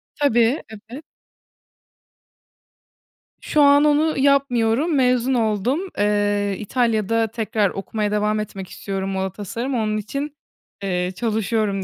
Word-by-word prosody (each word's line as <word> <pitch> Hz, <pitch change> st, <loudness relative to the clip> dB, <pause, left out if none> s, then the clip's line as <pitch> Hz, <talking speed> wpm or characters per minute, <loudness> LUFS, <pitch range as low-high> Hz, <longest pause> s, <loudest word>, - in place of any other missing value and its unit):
Tabii, 245 Hz, -1 st, +2 dB, 0.3 s
evet. 275 Hz, +6 st, -9 dB, 2.4 s
Şu 300 Hz, -, +1 dB
an 285 Hz, 0 st, +6 dB
onu 300 Hz, +1 st, +2 dB
yapmıyorum, 275 Hz, +1 st, +2 dB
mezun 255 Hz, -1 st, +2 dB
oldum. 225 Hz, -, +1 dB, 0.2 s
Eee, 205 Hz, -1 st, +1 dB
İtalya'da 225 Hz, -1 st, 0 dB
tekrar 215 Hz, -2 st, -1 dB
okumaya 210 Hz, +1 st, -3 dB
devam 210 Hz, 0 st, +1 dB
etmek 195 Hz, -3 st, -6 dB
istiyorum 195 Hz, -1 st, -4 dB
moda 190 Hz, 0 st, -2 dB
tasarımı, 230 Hz, +7 st, -4 dB
onun 215 Hz, -1 st, 0 dB
için, 275 Hz, +7 st, -4 dB, 0.5 s
eee, 180 Hz, -1 st, -1 dB
çalışıyorum 215 Hz, -2 st, -1 dB
225 Hz, 105 wpm, -21 LUFS, 205-260 Hz, 2.4 s, an